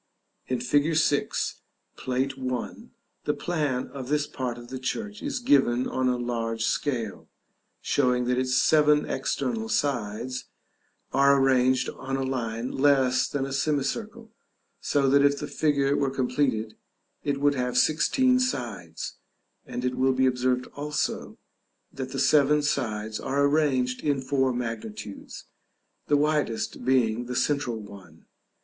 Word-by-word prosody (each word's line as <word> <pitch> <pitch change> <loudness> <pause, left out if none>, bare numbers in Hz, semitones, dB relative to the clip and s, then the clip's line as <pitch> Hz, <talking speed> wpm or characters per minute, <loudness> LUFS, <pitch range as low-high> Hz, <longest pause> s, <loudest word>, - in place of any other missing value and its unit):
In 130 -1 -1
fig. 145 +6 +2
6, 145 -2 0 0.3
Plate 130 +1 -1
I. 130 -2 -4 0.4
the - - 0
plan 150 -7 -1
of 135 -2 -7
this 150 0 +1
part 125 -4 -4
of 120 0 -11
the 130 - -5
church 210 - -4
is 285 -2 -2
given 135 - +3
on 130 0 0
a 125 - +1
large 115 -2 -2
scale, 120 -8 -2 0.5
showing 125 -1 +1
that 125 +1 +1
its 130 0 +2
seven 150 -1 +4
external 225 - -2
sides 125 - -1 0.7
are 140 +1 +5
arranged 130 -1 +3
on 135 0 -4
a 135 - -1
line 120 -2 -3
less 135 -2 +3
than 140 -2 -2
a 135 - -5
semicircle, 155 - -2 0.5
so 140 -2 +1
that 140 +1 +5
if 140 0 +4
the - - -4
figure 140 -2 +1
were 140 -1 +1
completed, 125 -4 0 0.5
it 140 -1 -1
would 145 0 +3
have 125 -2 -1
sixteen 255 - +3
sides; 130 - -3 0.5
and 125 - -4
it 125 - 0
will 130 +1 +2
be 130 0 +2
observed 125 0 +1
also, 150 +1 -3 0.6
that 130 -1 -5
the 135 - -4
seven 145 +2 +4
sides 110 -7 -2
are 140 +1 0
arranged 135 -4 +1
in 145 -2 +1
four 135 0 +1
magnitudes, 120 - -6 0.6
the 145 - +4
widest 150 -6 0
being 120 -3 +2
the 125 - -4
central 140 -4 0
one. 95 -6 -13
130 Hz, 140 wpm, -26 LUFS, 125-145 Hz, 0.7 s, are